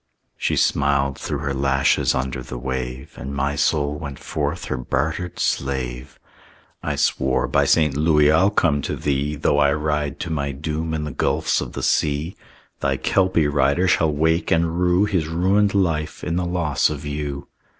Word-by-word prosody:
She -, -, -1 dB
smiled 70 Hz, -1 st, +1 dB
through 75 Hz, -, -3 dB
her 70 Hz, -2 st, -2 dB
lashes 70 Hz, 0 st, +2 dB
under 65 Hz, 0 st, -2 dB
the 60 Hz, 0 st, -7 dB
wave, 65 Hz, +1 st, -5 dB
And 70 Hz, +2 st, -6 dB
my 70 Hz, +1 st, -1 dB
soul 75 Hz, 0 st, 0 dB
went 70 Hz, -2 st, -6 dB
forth 75 Hz, +2 st, -3 dB
her 65 Hz, -, -3 dB
bartered 80 Hz, +8 st, -2 dB
slave. 65 Hz, -1 st, -2 dB, 0.6 s
I -, -, -2 dB
swore, 65 Hz, -1 st, +1 dB
"By 70 Hz, +1 st, +2 dB
St. 75 Hz, 0 st, +3 dB
Louis, 75 Hz, 0 st, +4 dB
I'll 85 Hz, +6 st, +4 dB
come 80 Hz, -8 st, +1 dB
to -, -, -3 dB
thee, 70 Hz, +1 st, -1 dB
Though 70 Hz, 0 st, +1 dB
I 70 Hz, -1 st, +4 dB
ride 75 Hz, -1 st, -2 dB
to 90 Hz, -, -4 dB
my 70 Hz, -3 st, -2 dB
doom 80 Hz, +3 st, -3 dB
in 75 Hz, -, -2 dB
the 75 Hz, -, -4 dB
gulfs -, -, 0 dB
of -, -, -6 dB
the -, -, -5 dB
sea! 75 Hz, +4 st, 0 dB, 0.4 s
"Thy -, -, 0 dB
Kelpie 95 Hz, -5 st, +2 dB
rider 75 Hz, +5 st, +2 dB
shall 80 Hz, -3 st, +3 dB
wake 80 Hz, +3 st, +1 dB
and 85 Hz, +1 st, +1 dB
rue 90 Hz, +2 st, +3 dB
His 90 Hz, -7 st, 0 dB
ruined 95 Hz, +5 st, +2 dB
life 80 Hz, -6 st, 0 dB
in 85 Hz, -, -2 dB
the 90 Hz, 0 st, 0 dB
loss 85 Hz, -5 st, +1 dB
of 75 Hz, 0 st, -6 dB
you." 75 Hz, -1 st, -4 dB
75 Hz, 175 wpm, -22 LUFS, 70-80 Hz, 0.6 s, Louis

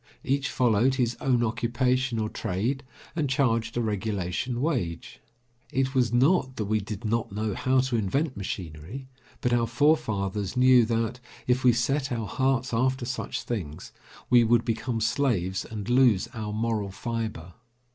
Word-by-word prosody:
Each 140 Hz, 0 st, 0 dB
followed 125 Hz, +1 st, +2 dB
his 120 Hz, -2 st, 0 dB
own 125 Hz, -3 st, +2 dB
occupation 125 Hz, +2 st, 0 dB
or 110 Hz, -1 st, 0 dB
trade, 115 Hz, +8 st, -2 dB, 0.3 s
and 150 Hz, -5 st, 0 dB
charged 115 Hz, -4 st, +1 dB
a -, -, +2 dB
regulation 105 Hz, +2 st, -2 dB
wage. 120 Hz, -, -2 dB, 0.5 s
It 135 Hz, 0 st, 0 dB
was 125 Hz, -4 st, +2 dB
not 130 Hz, +2 st, +3 dB
that 110 Hz, -, -2 dB
we 110 Hz, +2 st, +1 dB
did 105 Hz, +2 st, -7 dB
not 115 Hz, 0 st, -1 dB
know 105 Hz, +1 st, -2 dB
how 130 Hz, +6 st, +2 dB
to 130 Hz, -2 st, -1 dB
invent 130 Hz, -, 0 dB
machinery, 95 Hz, -, -6 dB, 0.3 s
but 125 Hz, -, +1 dB
our 120 Hz, -1 st, +2 dB
forefathers 110 Hz, -7 st, +1 dB
knew 125 Hz, -2 st, +6 dB
that, 115 Hz, +1 st, -1 dB, 0.3 s
if 125 Hz, +1 st, +1 dB
we 125 Hz, -, +7 dB
set 130 Hz, +4 st, 0 dB
our 115 Hz, -3 st, -2 dB
hearts 130 Hz, +1 st, 0 dB
after 130 Hz, +2 st, +1 dB
such 125 Hz, +1 st, -4 dB
things, 85 Hz, -11 st, -5 dB, 0.4 s
we 120 Hz, -1 st, +6 dB
would 115 Hz, +1 st, +3 dB
become 115 Hz, +1 st, -2 dB
slaves 110 Hz, -6 st, 0 dB
and 105 Hz, -2 st, -6 dB
lose 120 Hz, -5 st, +4 dB
our 110 Hz, -3 st, -4 dB
moral 110 Hz, -2 st, -1 dB
fibre. 105 Hz, -4 st, -5 dB
120 Hz, 155 wpm, -27 LUFS, 110-130 Hz, 0.5 s, we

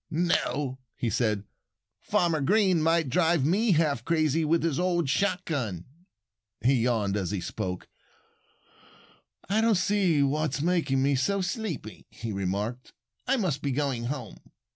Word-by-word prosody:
"No!" 150 Hz, -5 st, 0 dB, 0.2 s
he 115 Hz, -, -2 dB
said. 105 Hz, -4 st, 0 dB, 0.6 s
"Farmer 165 Hz, -4 st, +1 dB
Green 190 Hz, +1 st, +3 dB
might 165 Hz, -1 st, +2 dB
drive 165 Hz, +1 st, +2 dB
me 200 Hz, +6 st, +3 dB
half 150 Hz, -7 st, +1 dB
crazy 160 Hz, 0 st, +1 dB
with 160 Hz, +2 st, +2 dB
his 165 Hz, -3 st, 0 dB
old 175 Hz, -3 st, +1 dB
shotgun." 140 Hz, -, -1 dB, 0.8 s
He 130 Hz, +5 st, +3 dB
yawned 110 Hz, -5 st, +1 dB
as 95 Hz, -4 st, -1 dB
he 100 Hz, -, -2 dB
spoke. 90 Hz, +1 st, -5 dB, 1.6 s
"I 210 Hz, +3 st, +2 dB
don't 225 Hz, -1 st, +3 dB
see 185 Hz, -6 st, +2 dB
what's 150 Hz, +1 st, 0 dB
making 150 Hz, -5 st, +1 dB
me 140 Hz, +1 st, +2 dB
so 195 Hz, +10 st, +1 dB
sleepy," 180 Hz, -, -5 dB
he 115 Hz, -1 st, -6 dB
remarked. 100 Hz, +6 st, -3 dB, 0.3 s
"I 270 Hz, +2 st, +2 dB
must 170 Hz, -, -1 dB
be 140 Hz, -, -1 dB
going 130 Hz, -3 st, -1 dB
home." 125 Hz, -4 st, -5 dB
150 Hz, 140 wpm, -27 LUFS, 125-175 Hz, 1.6 s, Green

